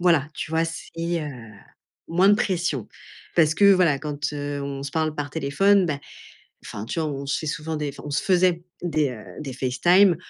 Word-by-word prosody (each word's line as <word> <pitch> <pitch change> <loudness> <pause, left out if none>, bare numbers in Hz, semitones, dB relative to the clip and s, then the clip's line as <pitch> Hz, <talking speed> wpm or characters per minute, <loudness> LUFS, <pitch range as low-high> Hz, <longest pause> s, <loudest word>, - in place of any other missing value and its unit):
voilà, 165 -5 +3
tu - - -5
vois, 160 +1 +2
c'est, 165 0 -7 0.3
heu, 150 - -4 0.8
moins 180 +4 +4
de 205 - +7
pression. 175 - -1 0.5
Parce 160 -2 +4
que 200 +3 +6
voilà 175 -7 +3
quand, 150 0 -3
heu, 145 -1 -3
on 140 -1 -4
se 140 - -5
parle 155 -1 0
par 145 -2 -4
téléphone, 180 +7 +3
bah, 145 -3 -2 0.6
enfin 105 +1 -6
tu 165 - -2
vois, 155 - 0
on 140 0 -5
se 140 - 0
fait 155 - -5
souvent 155 +1 -3
des 150 -1 -2
enfin 140 - -12
on - - -5
se 145 - 0
faisait 180 -2 +3 0.2
des, 155 -5 +1
heu, 110 -4 -9 0.2
des 140 -3 -5
FaceTime, 170 +9 +4
155 Hz, 205 wpm, -24 LUFS, 140-175 Hz, 0.8 s, de